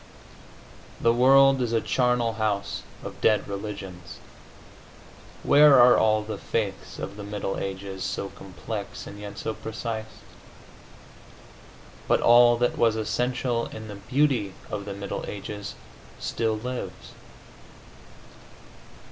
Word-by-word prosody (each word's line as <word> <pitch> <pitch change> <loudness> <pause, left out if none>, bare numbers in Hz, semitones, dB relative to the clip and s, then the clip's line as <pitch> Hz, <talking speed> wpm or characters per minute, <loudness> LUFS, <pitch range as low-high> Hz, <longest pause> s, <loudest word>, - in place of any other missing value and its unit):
The 115 - +3
world 135 +2 +6
is 120 -2 -1
a 115 - +3
charnel 125 -2 +1
house 105 -2 -2 0.2
of - - -8
dead 110 -1 +3
religions. 100 -3 -7 1.3
Where 145 -2 +7
are 120 0 +8
all 110 -1 +3
the 110 +1 -6
faiths 105 -4 -3
of 100 +1 -6
the 105 - -7
middle 100 -1 -3
ages, 95 -1 -5
so 100 +2 -3
complex 100 +3 -7
and 100 - -10
yet 100 0 -8
so 110 +2 -3
precise? 110 0 -5 2.0
But - - +3
all 120 0 +6
that 120 +1 0
was 115 -2 +4
essential 120 +2 -1
in 110 0 -9
the 105 - -7
beauty 130 -8 +1 0.2
of 100 -1 -4
the 100 -1 -5
middle 100 0 -5
ages 105 0 -6 0.4
still 110 -1 -1
lives.... 125 +3 -6
110 Hz, 120 wpm, -26 LUFS, 100-120 Hz, 2.0 s, are